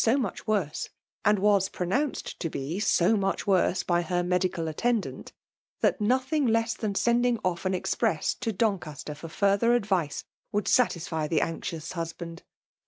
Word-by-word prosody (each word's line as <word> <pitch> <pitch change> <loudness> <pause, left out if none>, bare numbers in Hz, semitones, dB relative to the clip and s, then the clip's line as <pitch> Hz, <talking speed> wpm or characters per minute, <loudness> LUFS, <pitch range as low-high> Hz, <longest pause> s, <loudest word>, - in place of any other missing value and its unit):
0o 240 +5 +3
much 230 -3 -4
worsOj 195 -9 -1 0.3
and 210 0 +4
was 200 -1 +3
pronounced 250 +11 -2
to 165 - -2
be 145 +3 -4
iSO 205 0 +3
mw^h 195 -2 -1
worse 190 -2 +2
by 175 -1 +2
her 175 0 -1
medical 180 -1 0
attends^,, 220 +8 -1 0.5
that - - +2
nothing 260 +6 +2
less 225 0 +2
than 210 -3 -3
sending 240 +2 +2
off 180 0 -1
an 185 - +1
express 180 - 0
to 225 - -3
Doncaster 180 - -2
for 155 +3 -9
further 200 +7 +3
advice 190 -10 0 0.3
wouhl 205 0 -1
:satisfy 170 -9 +1
tiie 155 -1 +2
anxious 165 -1 -4
husband. 165 0 -6
195 Hz, 155 wpm, -27 LUFS, 170-225 Hz, 0.5 s, and